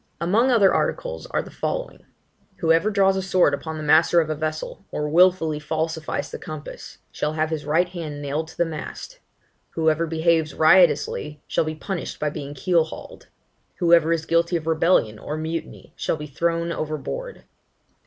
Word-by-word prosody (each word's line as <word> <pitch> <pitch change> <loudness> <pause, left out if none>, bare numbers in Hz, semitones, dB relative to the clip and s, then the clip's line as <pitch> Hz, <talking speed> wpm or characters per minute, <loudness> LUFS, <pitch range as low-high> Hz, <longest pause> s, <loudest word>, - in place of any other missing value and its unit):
Among 210 +9 +2
other 220 -6 +5
articles - - -2
are - - -1
the - - -12
following. - - -4 0.5
Whoever 165 +5 +2
draws 195 -2 +3
a 190 - -1
sword 185 -5 +3
upon 160 +2 -4
the 155 - -5
master 160 +3 +5
of 155 -1 0
a - - -1
vessel, 155 +1 -4
or 150 - -3
wilfully 165 -1 +3
falsifies 160 +1 -3
the - - -6
compass, 155 -1 -9
shall 150 - -2
have 155 0 -1
his 155 -2 -3
right 165 +4 +3
hand 165 -5 -6
nailed 145 +3 -3
to 160 - -14
the 170 - +2
mast. 165 - -7 0.6
Whoever 160 0 +1
behaves 160 -1 +1
riotously 155 -3 +3
shall - - 0
be 155 0 -3
punished 180 +3 -5
by 150 -1 -1
being 145 0 -7
keel 165 +3 +2
hauled. 160 - -11 0.5
Whoever 170 -2 +4
is 165 -1 0
guilty 170 +1 +1
of 160 -2 -2
rebellion 160 -9 +2
(or 150 - -5
mutiny) 160 +1 -6
shall - - -1
be 150 - -6
thrown 170 +3 -1
overboard. 170 - -5
160 Hz, 170 wpm, -23 LUFS, 155-175 Hz, 0.6 s, other